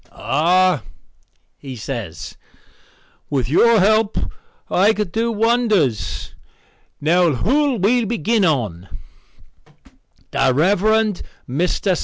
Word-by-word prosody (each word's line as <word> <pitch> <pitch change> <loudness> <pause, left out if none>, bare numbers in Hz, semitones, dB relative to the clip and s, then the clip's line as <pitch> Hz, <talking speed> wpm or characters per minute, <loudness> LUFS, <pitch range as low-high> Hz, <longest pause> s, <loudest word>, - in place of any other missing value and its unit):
"Ah," 165 - +1 0.8
he 135 -2 -8
says, 110 - -7 0.9
"with 135 -5 -1
your 225 - +4
help 215 +2 +2 0.5
I 200 +4 +3
could 210 -4 -3
do 230 +4 -1
wonders. 215 - 0 0.7
Now 170 +1 +2
who'll 270 - +1
we 230 +5 +2
begin 225 0 0
on?" 110 - -1 1.4
"The 135 -1 +2
Rev. 180 +6 +2 0.7
Mr. 175 +6 -1
180 Hz, 90 wpm, -19 LUFS, 135-220 Hz, 1.4 s, your